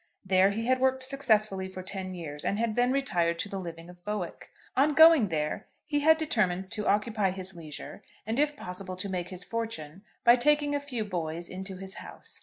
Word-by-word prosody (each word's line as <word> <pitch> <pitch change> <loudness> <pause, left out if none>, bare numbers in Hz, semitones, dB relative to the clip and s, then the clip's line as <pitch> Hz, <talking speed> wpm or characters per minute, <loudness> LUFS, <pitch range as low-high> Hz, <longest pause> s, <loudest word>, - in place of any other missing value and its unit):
There 190 0 +5
he 225 +3 -2
had 255 +1 +3
worked 260 0 +2
successfully 215 -8 +1
for 185 0 -7
ten 185 -1 -5
years, 150 -4 -6
and 200 - 0
had 225 -1 0
then 245 +1 +3
retired 175 -12 +1
to 200 - -3
the 195 - -4
living 170 -2 -7
of 175 0 -14
Bowick. 205 -4 -4 0.3
On 285 +3 +3
going 320 -7 +8
there 150 -3 -2 0.2
he 290 -1 0
had 320 +2 +6
determined 190 - 0
to 215 -2 -3
occupy 210 -1 +2
his 190 0 -5
leisure, 160 -4 -9 0.2
and 225 +4 -1
if 295 0 +2
possible 185 -2 -6
to 185 +2 -5
make 180 -2 -3
his 185 -1 -5
fortune, 195 -7 -5 0.2
by 240 +1 +7
taking 295 +2 +3
a 285 - +1
few 255 -6 -3
boys 170 -3 -3
into 190 0 -6
his 190 0 -8
house. - - -8
200 Hz, 205 wpm, -29 LUFS, 180-250 Hz, 0.3 s, going